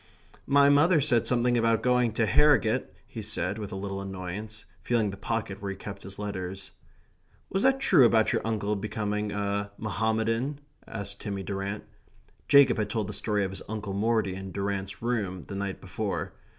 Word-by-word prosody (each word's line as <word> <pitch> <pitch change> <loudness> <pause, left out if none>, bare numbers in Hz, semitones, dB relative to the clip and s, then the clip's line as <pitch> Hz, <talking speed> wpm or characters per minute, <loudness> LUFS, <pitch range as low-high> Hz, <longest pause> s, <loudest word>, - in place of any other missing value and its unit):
"My 140 0 +6
mother 150 +4 +5
said 130 -5 +2
something 120 0 +2
about 115 -1 +2
going 125 -2 +3
to 115 0 +2
Harrogate," 125 0 +4 0.2
he 115 - -7
said 105 -1 -2
with 105 -2 -5
a - - -4
little 95 0 -4
annoyance, 95 +3 -6 0.2
feeling 110 -2 +1
the - - -7
pocket 100 -1 -3
where 100 - -3
he 95 - -5
kept 100 0 -8
his 95 +1 -9
letters. 95 -2 -5 0.8
"Was 195 - +1
that 265 +1 +4
true 145 - +5
about 110 -1 +3
your - - +1
uncle 105 -2 -1
becoming 105 0 -2
a 100 0 -1
Mohammedan?" 110 +5 -1 0.3
asked 100 0 -5
Timmy 100 -2 -4
Durrant. 100 +1 -4 0.6
Jacob 140 -4 +6
had 105 -1 -1
told 110 0 -1
the - - -4
story 105 -2 0
of 95 - -2
his 95 - -7
Uncle 105 -2 -4
Morty 110 -1 +1
in 95 0 -7
Durrant's 100 +1 -3
room 105 -7 -1
the 100 - -8
night 100 -1 -3
before. - - -3
105 Hz, 175 wpm, -28 LUFS, 100-115 Hz, 0.8 s, My